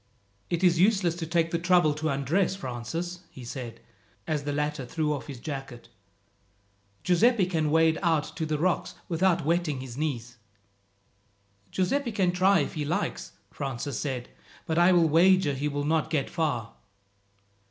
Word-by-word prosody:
"It 170 +1 -1
is 170 -2 +4
useless 190 -3 +3
to 165 -2 -4
take 165 0 +1
the 170 - 0
trouble 175 -3 +4
to 155 +1 -2
undress, 155 +8 +1
Francis," 165 +5 -5
he 125 - -11
said, 120 -1 -7 0.5
as 150 -2 -2
the 145 - -1
latter 150 -1 -2
threw 150 +4 -1
off 135 -6 -6
his 135 -4 -8
jacket. 135 -4 -7 1.1
"Giuseppi 200 +3 +4
can 160 -4 0
wade 160 +1 +3
out 165 -5 +2
to 160 -2 -2
the 155 -1 0
rocks 175 +4 0
without 170 -1 +1
wetting 165 -4 0
his 130 -1 -8
knees." 125 -6 -3 1.3
"Giuseppi 235 +8 0
can 190 -4 +1
try 185 0 +4
if - - -3
he 150 - -3
likes," 175 +8 -3 0.2
Francis 135 -2 -4
said, 130 -4 -4 0.4
"but 160 +1 0
I 175 +2 +6
will 170 -2 +5
wager 170 0 +4
he 140 +2 -2
will 145 0 -2
not 160 0 +1
get 150 -4 -1
far." 145 -10 -2
160 Hz, 160 wpm, -27 LUFS, 140-175 Hz, 1.3 s, I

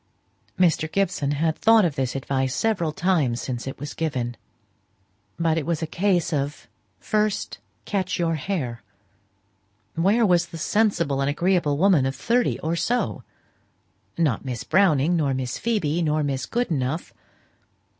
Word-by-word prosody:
Mr. 160 -3 +2
Gibson 180 -7 0
had 155 +2 0
thought 225 -2 +5
of 165 - 0
this 130 -1 -2
advice 135 -1 -1
several 200 -8 0
times 160 -9 +1
since 125 -1 -4
it 135 - -5
was 145 +2 -6
given; 125 -7 -2 1.0
but 165 -1 +1
it 150 - -5
was 170 -1 -1
a - - +1
case 175 0 0
of 145 0 -3 0.3
"first 215 - -1 0.3
catch 190 -2 -1
your 170 -1 +1
hare." 145 -7 -3 1.1
Where 200 +8 +3
was 175 -3 +3
the 165 - -9
"sensible 170 -7 +1
and 135 - +1
agreeable 170 -1 +1
woman 170 -6 +4
of 135 - -3
thirty 235 - +1
or 160 +2 -1
so?" 240 +8 -1 1.0
Not 155 -9 +1
Miss 125 -3 -4
Browning, 175 -4 +3
nor 145 -5 +1
Miss 130 -1 -3
Phoebe, 175 -9 0
nor 155 -1 +1
Miss 135 -2 -2
Goodenough. 160 - -2
160 Hz, 145 wpm, -24 LUFS, 140-185 Hz, 1.1 s, thought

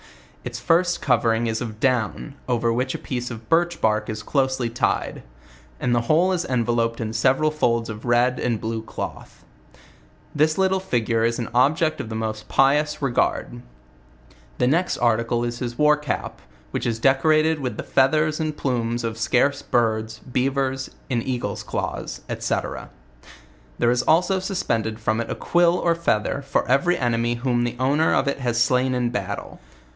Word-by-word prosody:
Its - - -5
first 175 +1 +2
covering 115 -3 +2
is 115 0 -2
of 110 -3 -6
down, 130 +2 0 0.2
.over 115 -1 +1
which 130 +2 -1
a - - -2
piece 125 -1 -4
of 115 -2 -9
birch 170 +3 +2
bark 105 -1 +1
is 110 -1 -5
closely 130 -3 0
tied; 115 +1 -1 0.6
and 125 - 0
the 120 - +2
whole 160 +10 +3
is 180 -2 0
enveloped 115 -3 0
in 110 -1 -3
several 135 +6 +2
folds 115 -6 0
of 110 0 -7
red 120 +1 +2
and 115 -3 -1
blue 110 +1 -3
cloth. 110 - -8 0.9
..This 155 +1 +2
little 190 0 +2
<figue 120 -10 0
is 115 0 +1
an 120 - -4
object 155 +6 +2
of 110 - -8
the 110 - -5
most 110 -1 -4
pious 150 +3 +2
regard. 120 - -1 1.0
The - - +2
next 165 +8 +1
articlo 115 0 +1
is 120 0 -5
his 120 -1 -4
war 150 0 +5
cap, 150 -4 -4 0.3
which - - -2
is 115 -1 -1
decorated 155 +5 +3
with 130 -3 -4
the - - -4
feathers 155 +3 +2
and 155 -1 -2
plumes 120 -2 -1
of 115 -1 -3
scarce 130 +4 +2
birds, 110 -2 0
beavers, 130 +1 -1 0.2
a:id 120 -2 +1
eagles' 120 -6 -3
claws, - - -4 0.2
&c. - - 0 1.2
There 120 - +3
is 120 0 +2
also 180 +7 +3
BUB 190 0 -3
pended 110 -1 -1
from 110 +1 0
it 115 - -6
.a - - -2
quill 175 0 +2
or 170 - +2
feather 140 -6 0
for 135 - -1
every 140 +8 +2
enemy 120 -1 0
whom 120 0 0
the 120 0 -2
owner 145 +5 +2
of 135 - +1
it 140 - -1
has 120 -2 -1
slain 125 +1 +2
In 120 -1 0
bairlo. 100 -2 -5
125 Hz, 170 wpm, -23 LUFS, 115-150 Hz, 1.2 s, war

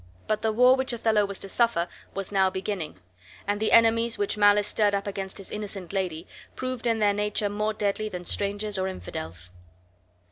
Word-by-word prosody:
But 215 0 -1
the 220 - +1
war 250 +4 +6
which 260 -1 0
Othello 220 -3 +2
was 200 -1 -5
to - - 0
suffer 220 -5 +1 0.3
was 195 0 -4
now 190 -1 +3
beginning; 185 - -4 0.5
and 205 +1 -1
the 220 - +1
enemies 230 0 +5
which 205 - 0
malice 205 0 +5
stirred 210 -1 +2
up 200 - -2
against 195 -1 -5
his 195 - -8
innocent 200 -3 -5
lady 180 -4 -2 0.3
proved 255 -2 -3
in 230 -1 +2
their 205 -2 +3
nature 210 0 0
more 210 +1 -1
deadly 215 +1 -1
than 180 -3 -7
strangers 205 +1 -2
or 185 - 0
infidels. 85 - -7
205 Hz, 185 wpm, -26 LUFS, 190-215 Hz, 0.5 s, war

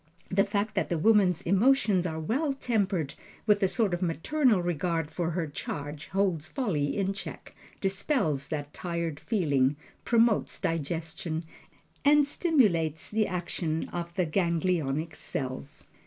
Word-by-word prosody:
The 195 +1 +3
fact 210 +1 -1
that - - 0
the 170 - 0
woman's 190 -1 +4
emotions 195 -1 +3
are 160 -1 -4
well 270 - 0
tempered 195 - 0 0.3
with 210 -1 +4
a 195 - +4
sort 210 -1 +1
of 175 - -1
maternal 215 - +2
regard 170 -2 -1
for 165 +1 -1
her 170 0 -1
charge 145 0 -6
holds 190 -5 0
folly 180 - -1
in 195 -1 0
check, 195 - -9 0.3
dispels 190 - 0
that 145 -1 -4
tired 170 -4 -3
feeling, 145 - +1 0.3
promotes 230 -2 +2
digestion, 165 +1 -2 0.6
and 290 0 +6
stimulates 205 - +1
the 215 0 +2
action 170 -3 -2
of 170 -1 -4
the 180 - +2
ganglionic 165 -3 0
cells. 135 +2 -5
175 Hz, 135 wpm, -28 LUFS, 160-205 Hz, 0.6 s, and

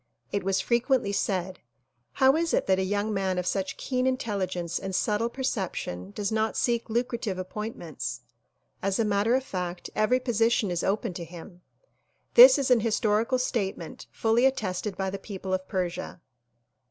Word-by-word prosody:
It 200 -2 -1
was 195 0 +1
fre 235 - +2
quently 245 -6 +1
said 190 -2 -1 0.5
"How 265 +1 +4
is 330 0 +1
it - - +1
that 190 0 +2
a - - +1
young 205 +3 -1
man 190 -2 0
of 180 - -1
such 190 +1 -2
keen 255 -1 -1
intelli 215 -7 -1
gence 175 -2 -3
and 190 -1 -4
subtle 215 +4 +1
perception 190 - -3
does 200 - -3
not 220 0 0
seek 235 -1 0
lucrative 235 -4 -1
appointments? 185 - -5 0.6
As 195 0 0
a 230 - +2
matter 210 +3 +2
of 265 - 0
fact 180 -6 -5
every 215 +4 +3
position 230 -4 +1
is 175 -1 -1
open 195 -1 0
to 175 - -6
him." 175 +1 -11 0.7
This - - +10
is 270 -2 0
a 245 - +6
historical 220 +2 +1
statement 195 -9 -3
fully 230 +3 +3
attested 200 -5 -2
by 190 -1 -1
the 195 - -5
people 190 -2 -5
of 185 0 -2
Persia. 180 -2 -3
205 Hz, 170 wpm, -27 LUFS, 185-235 Hz, 0.7 s, This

